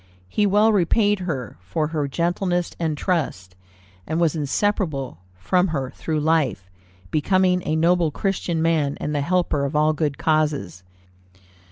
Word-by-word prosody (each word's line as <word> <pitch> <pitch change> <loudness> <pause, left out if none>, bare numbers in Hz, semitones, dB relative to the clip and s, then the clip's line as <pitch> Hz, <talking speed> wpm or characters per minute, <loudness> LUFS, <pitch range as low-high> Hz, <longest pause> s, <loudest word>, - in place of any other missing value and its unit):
He 205 - +1
well 210 +3 +4
repaid 205 +2 +2
her 150 - -4
for 150 - -2
her 150 -3 -1
gentleness 175 +3 -1
and 160 -3 -1
trust, 95 - -2 0.5
and 160 - -1
was 165 -3 +2
inseparable 150 - -1 0.2
from 180 - +1
her 135 -6 -3
through 155 -2 -3
life, 150 - 0 0.4
becoming 180 +3 +2
a 155 - +1
noble 170 +1 +3
Christian 175 -1 -1
man, 155 -4 +1
and 150 - -3
the 145 - 0
helper 170 -2 0
of 140 +2 -2
all 155 +1 +3
good 150 -2 -1
causes. 150 - 0
160 Hz, 145 wpm, -22 LUFS, 145-180 Hz, 0.5 s, well